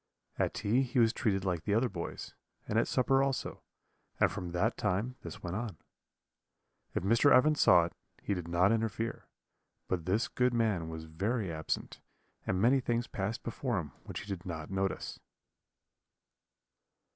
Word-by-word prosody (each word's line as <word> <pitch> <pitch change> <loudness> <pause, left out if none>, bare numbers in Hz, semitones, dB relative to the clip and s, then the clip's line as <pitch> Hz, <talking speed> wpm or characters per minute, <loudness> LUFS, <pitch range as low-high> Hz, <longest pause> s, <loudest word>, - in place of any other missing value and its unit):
At - - +1
tea 115 +6 +2
he 130 0 -2
was 115 -1 +5
treated 100 -6 0
like 90 -3 0
the 100 +4 0
other 120 +3 +3
boys, 85 -7 -6 0.3
and 110 - +2
at - - +1
supper 135 +1 +3
also, 135 -2 -1 0.6
and - - +4
from 90 - -4
that 105 +7 +1
time 105 +5 -1
this 85 - -9
went 90 +1 -3
on. 110 -1 -4 1.2
If - - 0
Mr. 115 +8 +4
Evans 150 +4 +5
saw 85 -2 +7
it, 85 - -7 0.3
he 100 - 0
did 90 -3 -4
not 90 +4 +3
interfere; 115 0 -1 0.6
but 90 -2 -2
this 105 +5 +2
good 125 -1 +1
man 105 -8 +1
was 80 0 -6
very 95 +6 -2
absent, 80 0 -3 0.5
and 95 - +1
many 125 +6 +5
things 120 -1 0
passed 105 +4 -3
before 120 -1 -2
him 80 -5 -3
which - - -5
he - - -10
did 95 -4 -4
not 80 -2 -6
notice. 95 0 -2
105 Hz, 165 wpm, -32 LUFS, 90-120 Hz, 1.2 s, saw